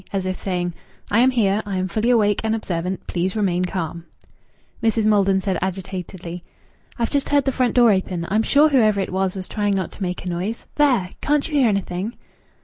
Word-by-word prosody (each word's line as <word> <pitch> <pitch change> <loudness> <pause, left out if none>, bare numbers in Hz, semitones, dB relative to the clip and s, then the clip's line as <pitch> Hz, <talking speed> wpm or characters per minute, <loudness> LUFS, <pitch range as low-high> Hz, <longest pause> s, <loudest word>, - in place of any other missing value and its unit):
as 195 -2 -2
if 185 0 -1
saying: 175 -2 -2 0.4
"I 210 - +4
am 255 +2 +6
here. 215 -5 +2
I 200 -2 -3
am 185 0 -1
fully 215 +6 0
awake 210 -4 +3
and 220 0 +1
observant. 180 -3 -3
Please 185 +2 -2
remain 185 -4 +1
calm." 170 -2 -4 0.7
Mrs. 225 -1 +2
Maldon 195 -2 +3
said 190 -2 -1
agitatedly 185 -2 -5 0.6
"I've 235 -2 -1
just 280 -1 0
heard 285 -1 +3
the 270 - +2
front 255 -1 0
door 240 -3 +6
open. 185 -3 -1
I'm 215 +2 +2
sure 290 +6 +4
whoever 215 -7 +3
it 190 - -2
was 190 0 0
was 185 -1 -6
trying 205 -2 0
not 190 -3 -2
to - - -14
make 180 -1 -3
a - - -2
noise. 185 +6 -3
There! 250 -11 +2
Can't 295 0 +1
you 320 - -9
hear 270 -5 +4
anything?" 195 +2 -2
195 Hz, 205 wpm, -22 LUFS, 185-225 Hz, 0.7 s, am